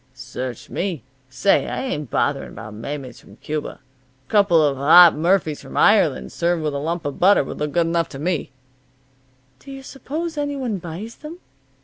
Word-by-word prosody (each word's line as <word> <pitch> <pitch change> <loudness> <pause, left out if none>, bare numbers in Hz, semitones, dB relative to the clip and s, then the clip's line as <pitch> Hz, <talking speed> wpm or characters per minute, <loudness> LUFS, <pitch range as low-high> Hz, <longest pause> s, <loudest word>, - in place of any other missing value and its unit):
"Search 130 -2 -7
me. 175 - -3 0.3
Say, 130 +10 +2
I - - -3
ain't 150 - -4
bothering - - -1
about 105 0 -9
maymeys 130 +3 -7
from - - -17
Cuba. 155 0 -5 0.5
A - - -19
couple 200 -6 +4
of 145 -3 +2
hot 160 +5 +7
murphies 165 -1 +1
from - - -9
Ireland, 65 0 +3
served 170 -1 -1
with 150 -1 -1
a 140 - -2
lump 165 +3 -3
of 145 - -4
butter, 195 -3 +5
would - - -8
look 150 -1 -3
good 170 -1 +2
enough 165 0 0
to 135 - -9
me." 165 +2 -2 1.1
"Do 275 - -15
you 270 0 -9
suppose 300 +5 -5
any 285 0 -2
one 245 -8 -3
buys 175 +7 -8
them?" 310 +3 -9
165 Hz, 180 wpm, -21 LUFS, 140-200 Hz, 1.1 s, hot